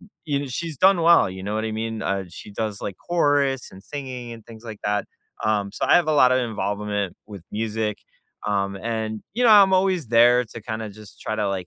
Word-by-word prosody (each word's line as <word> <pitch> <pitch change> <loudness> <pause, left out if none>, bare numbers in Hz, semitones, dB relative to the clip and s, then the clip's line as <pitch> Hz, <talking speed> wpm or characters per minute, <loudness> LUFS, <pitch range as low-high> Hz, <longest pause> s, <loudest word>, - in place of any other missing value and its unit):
You 205 - -17 0.3
kn 140 - -5
she's 160 +5 -4
done 190 +3 +5
well, 170 - +6
you 95 0 -8
know 100 +2 -3
what 110 +1 -1
I 110 - -2
mean? 110 0 -3
Uh, 100 0 -1
she 90 - -11
does, 105 0 -4
like, 100 - -5
chorus 145 -6 +1
and 95 - -13
singing 130 -2 -7
and 115 -2 -11
things 115 0 -13
like 110 -3 -8
that, 105 0 0 0.4
um, 105 -2 +1
so - - -2
I - - +6
have 175 -3 +2
a - - +3
lot 130 -4 +5
of 130 - +3
involvement 105 -4 -2
with 100 -4 -10
music. 110 0 -2 0.5
Um, 100 -1 0
and, 110 0 -3
you 245 - 0
know, 235 - +7
I'm 200 -3 +7
always 185 -5 +2
there 120 +2 +5
to, 115 0 -10
kinda, 110 0 -4
just 105 0 -14
try 110 - -3
to, 105 -2 0
like, 95 -2 -3
110 Hz, 225 wpm, -23 LUFS, 105-135 Hz, 0.5 s, know